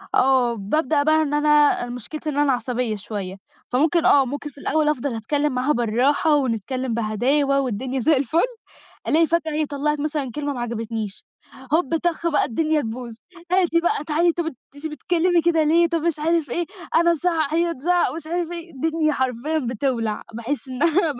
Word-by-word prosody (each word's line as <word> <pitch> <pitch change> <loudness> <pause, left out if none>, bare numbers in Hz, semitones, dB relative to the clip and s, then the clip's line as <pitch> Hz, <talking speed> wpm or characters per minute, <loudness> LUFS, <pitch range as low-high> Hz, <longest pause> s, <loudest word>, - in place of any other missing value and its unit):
آه 255 -2 +3
بابدأ 285 +8 0
بقى 310 +1 +3
إن 295 -2 -1
أنا 295 0 +2 0.3
أنا 245 - -4
مشكلتي 250 +6 -5
إن 290 - -3
أنا 290 -1 +3
عصبية 245 -2 -1
شوية، 200 -2 -5 0.3
فممكن 320 +7 +2
آه 285 -7 +6
ممكن 285 +3 -5
في 285 - -23
الأول 305 +2 0
أفضل 280 -3 -1
أتكلّم 290 +6 0
معاها 255 +3 0
بالراحة 265 +5 +2
ونتكلّم 255 -1 -1
بهداوة 260 +6 +1
والدنيا 260 +1 -3
زي 290 +5 +3
الفُل، 280 +5 +1 0.7
الاقي 325 +1 +4
فجأة 330 -1 0
هي 305 0 0
طلّعِت 295 +1 -2
مثلًا 295 -3 -2
كلمة 290 -1 -2
ما 250 - -6
عجبتنيش، 225 -3 -4 0.5
هوب 330 -1 +2
طخ 340 0 -1
بقى 295 - +2
الدنيا 310 +5 0
تبوظ، 235 -1 -6 0.4
عادي 355 -2 +3
بقى 390 +4 0
تعالي 320 +3 +1
أنتِ 345 0 +1
بت 320 -4 -4 0.2
أنتِ 290 +2 -5
بتتكلّمي 340 +3 +1
كده 325 -1 +2
ليه، 335 +3 +4
طَب 335 -1 -1
مش 330 -2 0
عارف 320 -2 +1
إيه، 345 +6 -1 0.3
أنا 340 +1 +5
ازعّق 325 -2 0
هي 335 +1 +1
تزعّق 345 +5 +1
ومش 320 0 -7
عارف 345 0 -2
إيه، 340 0 -6
الدنيا 310 +2 0
حرفيًا 260 +4 -1
بتولع، 240 -4 -2
باحس 245 +5 -4
إن 255 +1 -2
أنا 325 -5 +2
295 Hz, 180 wpm, -22 LUFS, 250-320 Hz, 0.7 s, آه